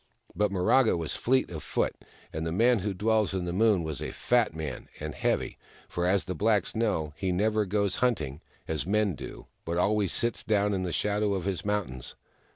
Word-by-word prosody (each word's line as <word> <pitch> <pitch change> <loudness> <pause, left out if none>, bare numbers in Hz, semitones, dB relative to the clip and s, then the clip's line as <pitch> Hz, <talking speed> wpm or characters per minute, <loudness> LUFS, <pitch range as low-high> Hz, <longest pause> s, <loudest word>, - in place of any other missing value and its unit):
But 105 0 +2
Miraga 100 +4 +3
was 80 -3 -3
fleet 130 -3 +1
of 80 -3 -5
foot; - - -1 0.4
and 80 - -3
the 80 - -2
Man 115 +6 +4
Who 100 +2 -2
Dwells 105 +1 +1
In 90 -2 -1
The 85 - -3
Moon 105 -2 +3
was 80 -4 -4
a - - -3
fat 120 -8 +1
man, 75 -5 -5
and - - -4
heavy: - - -1 0.3
for, 85 0 -1
as 95 +1 +3
the 95 - -4
blacks 105 +2 +1
know, 100 -10 0
he 95 -1 -1
never 105 +3 +2
goes 100 -1 0
hunting, 80 - 0 0.3
as 80 0 -2
men 105 -1 +2
do, - - -8 0.2
but 85 +1 -2
always 100 +1 +2
sits 120 0 0
down 105 -1 +2
in 95 - 0
the 90 -1 -2
shadow 105 +2 +1
of 95 -2 -3
his 95 -3 -2
mountains. 100 -12 -3
100 Hz, 200 wpm, -28 LUFS, 85-105 Hz, 0.4 s, Man